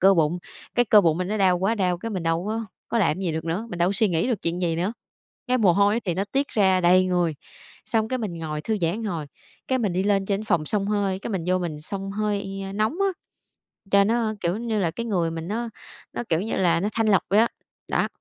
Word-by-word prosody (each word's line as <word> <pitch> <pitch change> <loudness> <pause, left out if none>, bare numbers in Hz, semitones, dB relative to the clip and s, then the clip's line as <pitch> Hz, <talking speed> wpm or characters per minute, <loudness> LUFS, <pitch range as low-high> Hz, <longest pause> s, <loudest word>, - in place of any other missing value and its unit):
cơ 195 +1 +6
bụng, 165 +1 +2 0.4
cái 245 - +4
cơ 210 -1 +7
bụng 165 -3 +2
mình 185 +1 -2
nó 215 - -1
đau 185 -3 +3
quá 195 +5 +1
đau, 180 -5 0
cái 230 - -5
mình 190 -5 -3
đâu 165 +1 0
có 225 +1 -2 0.2
có 235 - 0
làm 170 -7 +3
cái 190 - -6
gì 175 -4 0
được 160 0 -3
nữa, 175 +7 -2
mình 175 - -5
đâu 175 - +3
có - - 0
suy 205 +2 +2
nghĩ 165 +1 +1
được 230 -6 -1
chuyện 175 +2 -1
gì 165 -2 +1
nữa. 180 +6 0 0.6
Cái 250 0 +2
mồ 200 -7 +4
hôi 200 +2 +4
ấy - - +1
thì 185 -7 -2
nó 190 +3 0
tiết 275 +1 +1
ra 190 -3 +3
đầy 180 +1 +5
người, 175 -3 +1 0.5
xong 220 -1 0
cái 255 - -1
mình 210 -6 -3
ngồi 155 -2 -4
thư 220 +6 -1
giãn 165 -1 +2
một 225 - -5
hồi, 170 -7 -3 0.4
cái 260 - +2
mình 205 -6 0
đi 185 +2 +1
lên 200 -1 +2
trên 195 0 0
cái - - -8
phòng 155 -3 +2
xông 200 +3 0
hơi, 200 -2 0
cái - - -6
mình 190 -5 -2
vô 185 0 +2
mình 160 -4 -4
xông 195 +4 -5
hơi 200 -1 -2
nóng 215 +1 +1
á, 395 - +3 0.8
cho 200 0 +6
nó, 225 +1 +1
kiểu 175 +3 0
như 225 -2 -1
là, 175 -4 +1
cái 230 +8 -5
người 175 -7 0
mình 165 0 -5
nó 230 +4 -2 0.4
nó, - - -3
kiểu 165 0 +2
như 220 - -3
là, 175 -3 +3
nó 200 +4 0
thanh 225 0 +1
lọc 195 -3 +4
vậy 200 +3 +5
á, 230 - +5 0.4
đó. - - +2
195 Hz, 275 wpm, -24 LUFS, 175-215 Hz, 0.8 s, cơ